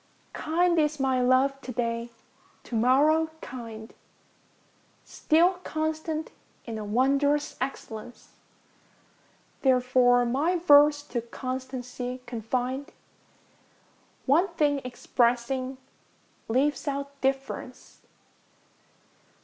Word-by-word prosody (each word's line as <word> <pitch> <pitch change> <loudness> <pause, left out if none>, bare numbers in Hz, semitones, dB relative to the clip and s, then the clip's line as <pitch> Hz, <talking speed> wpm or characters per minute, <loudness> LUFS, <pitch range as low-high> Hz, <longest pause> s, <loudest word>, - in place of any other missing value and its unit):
Kind 340 +2 +1
is 300 -1 +1
my 260 -1 +1
love 265 +2 +2
to 260 - -7
day, 235 0 -2 0.5
to - - -13
morrow 290 +7 +3
kind, 230 -5 -9 1.1
Still 350 +4 +2
constant 315 0 -3 0.3
in 225 -2 -5
a - - -5
wondrous 275 +7 +1
excellence; 240 -3 -6 1.3
Therefore 250 -1 +4
my 285 +9 +1
verse 290 -3 +5
to 245 -5 -3
constancy 255 0 -5
confinŌĆÖd, 250 +3 -3 1.4
One 320 +8 +4
thing 295 -5 +1
expressing, 250 +1 -1 0.7
leaves 275 +6 0
out 280 0 -4
difference. 270 -1 -3
265 Hz, 85 wpm, -27 LUFS, 245-295 Hz, 1.4 s, verse